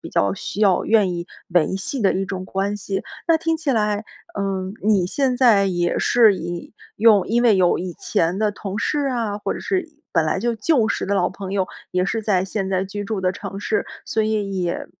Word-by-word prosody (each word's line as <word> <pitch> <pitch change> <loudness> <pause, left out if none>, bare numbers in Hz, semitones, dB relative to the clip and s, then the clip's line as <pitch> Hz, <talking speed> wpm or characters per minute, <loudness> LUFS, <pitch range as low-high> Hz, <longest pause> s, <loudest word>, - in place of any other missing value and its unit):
比 - - -8
较 100 -1 +2
需 205 - -5
要 195 -4 +4
愿 210 -5 +3
意 170 0 -4 0.2
维 175 +1 +2
系 270 +8 -3
的 195 - +4
一 195 +1 0
种 185 -1 -5
关 195 +2 -1
系。 195 -1 -4 0.2
那 330 - +6
听 325 0 0
起 310 -4 -1
来， 210 -2 0 0.3
呃， 195 -1 -2
你 200 -4 +3
现 260 +4 0
在 220 -6 +5
也 175 -2 0
是 225 -4 +5
以 175 +1 -6 0.2
用 215 -2 +5
因 240 +2 +2
为 230 -4 +5
有 180 -1 +4
以 180 0 -4
前 170 +3 0
的 215 0 +2
同 200 0 -6
事 295 - 0
啊， 225 -5 -1
或 210 - -2
者 - - -6
是 380 -1 0
以 305 -2 -20
本 165 -2 +3
来 155 - 0
就 235 -1 0
旧 225 0 +2
时 - - -1
的 200 - 0
老 180 -2 +2
朋 190 0 -7
友， 190 -2 0 0.2
也 180 +1 +1
是 225 +2 -1
在 190 -4 +2
现 195 0 -3
在 190 0 +1
居 205 +1 -5
住 215 -2 -3
的 185 -1 +1
城 195 +1 -7
市， 215 - 0 0.2
所 220 - 0
以 205 -3 -1
也 170 - -2
200 Hz, 240 characters per minute, -21 LUFS, 185-220 Hz, 0.3 s, 那